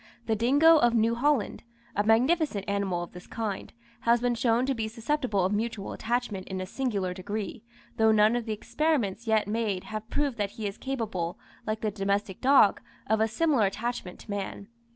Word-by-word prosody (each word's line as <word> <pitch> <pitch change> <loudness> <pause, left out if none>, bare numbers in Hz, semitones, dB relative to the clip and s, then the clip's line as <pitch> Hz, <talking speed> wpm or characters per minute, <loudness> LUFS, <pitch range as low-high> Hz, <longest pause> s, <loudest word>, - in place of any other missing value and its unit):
The 220 - +1
Dingo 285 +9 +5
of 240 -2 +3
New 230 +1 +3
Holland, 265 0 +1 0.3
a 205 - +2
magnificent 235 - +2
animal 200 -3 -1
of 175 - -9
this 180 0 -12
kind, 215 -4 -4 0.3
has 235 +1 +3
been 245 0 +1
shown 235 +1 +2
to 270 - +1
be 225 -3 -2
susceptible 230 -3 -1
of 190 - 0
mutual 215 -1 -2
attachment 230 -5 -2
in 190 -1 -4
a 185 - -3
singular 200 -5 -2
degree, 205 +3 -5 0.4
though 220 0 +5
none 215 +1 +4
of 240 -2 -2
the 220 - -3
experiments 235 -2 -1
yet 220 -2 +2
made 210 -3 -1
have 215 +1 -6
proved 285 -5 -1
that 205 -1 -1
he 220 - -4
is 200 0 -4
capable, 220 -10 -3 0.3
like 215 0 -2
the 215 - 0
domestic 200 -1 -2
dog, 265 -6 +5 0.2
of 220 +1 +1
a 220 - +4
similar 250 -2 +2
attachment 215 -2 -4
to 210 - -9
man. 200 +1 -5
220 Hz, 190 wpm, -28 LUFS, 200-240 Hz, 0.4 s, Dingo